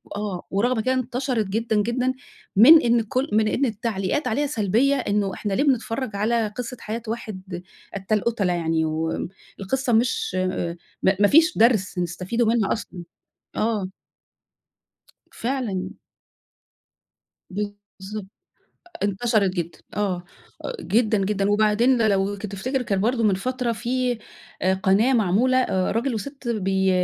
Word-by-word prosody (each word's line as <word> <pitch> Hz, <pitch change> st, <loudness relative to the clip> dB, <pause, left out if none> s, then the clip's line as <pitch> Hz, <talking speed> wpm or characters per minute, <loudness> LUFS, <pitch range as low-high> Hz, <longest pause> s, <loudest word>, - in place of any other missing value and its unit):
آه، 205 Hz, -4 st, -4 dB
ورغم 225 Hz, +4 st, +1 dB
كانت 255 Hz, +2 st, +1 dB
انتشرِت 250 Hz, -2 st, -1 dB
جدًا، 220 Hz, +3 st, -1 dB
جدًا 250 Hz, +4 st, 0 dB, 0.4 s
من 295 Hz, +11 st, +9 dB
إن 235 Hz, -1 st, +3 dB
كلّ 255 Hz, +5 st, -2 dB
من 215 Hz, 0 st, +3 dB
إن 270 Hz, +5 st, +1 dB
التعليقات 220 Hz, +3 st, -2 dB
عليها 290 Hz, +6 st, 0 dB
سلبيّة 235 Hz, +3 st, +2 dB
إنه 205 Hz, -5 st, 0 dB
إحنا 205 Hz, 0 st, -3 dB
ليه 275 Hz, -, +2 dB
بنتفرّج 250 Hz, -4 st, 0 dB
على 225 Hz, +2 st, +1 dB
قِصّة 245 Hz, +4 st, -6 dB
حياة 225 Hz, +2 st, -5 dB
واحد 190 Hz, -5 st, -6 dB, 0.3 s
قتّال 200 Hz, +2 st, 0 dB
قُتلا 205 Hz, -6 st, +1 dB
يعني 165 Hz, -1 st, 0 dB
و 160 Hz, +1 st, -2 dB, 0.3 s
القِصّة 250 Hz, +5 st, -1 dB
مش 225 Hz, -4 st, +1 dB, 0.7 s
ما 190 Hz, 0 st, +3 dB
ما 205 Hz, -, +6 dB
فيش 325 Hz, -, +5 dB
درْس 215 Hz, -4 st, +3 dB
نستَفيده 180 Hz, +7 st, -1 dB
منها 225 Hz, -3 st, +2 dB
أصلًا، 185 Hz, -5 st, -7 dB, 0.5 s
آه. 215 Hz, -4 st, 0 dB, 1.4 s
فعلًا. 230 Hz, -7 st, -2 dB, 1.6 s
ب 205 Hz, +2 st, -2 dB, 0.3 s
بالضبط، 200 Hz, +1 st, -6 dB, 0.8 s
انتشرِت 205 Hz, 0 st, +1 dB
جدًا، 170 Hz, -1 st, -4 dB, 0.2 s
آه 190 Hz, -4 st, -1 dB, 0.6 s
جدًا، 220 Hz, 0 st, +2 dB
جدًا، 200 Hz, 0 st, 0 dB
وبعدين 215 Hz, +3 st, +3 dB
لو 195 Hz, 0 st, +1 dB
تفتِكر 210 Hz, +6 st, -3 dB
كانت 195 Hz, -5 st, -1 dB
برضه 235 Hz, +2 st, +1 dB
من 205 Hz, -3 st, +4 dB
فترة 250 Hz, +4 st, -2 dB
في 245 Hz, +1 st, -1 dB, 0.4 s
آآ 185 Hz, +1 st, +3 dB
قناة 195 Hz, +7 st, +3 dB
معمولة 230 Hz, +4 st, +3 dB
آآ، 190 Hz, -7 st, +1 dB
راجل 235 Hz, +3 st, 0 dB
وسِت 270 Hz, +3 st, -6 dB
بي 190 Hz, -3 st, +1 dB
215 Hz, 130 wpm, -23 LUFS, 195-245 Hz, 1.6 s, من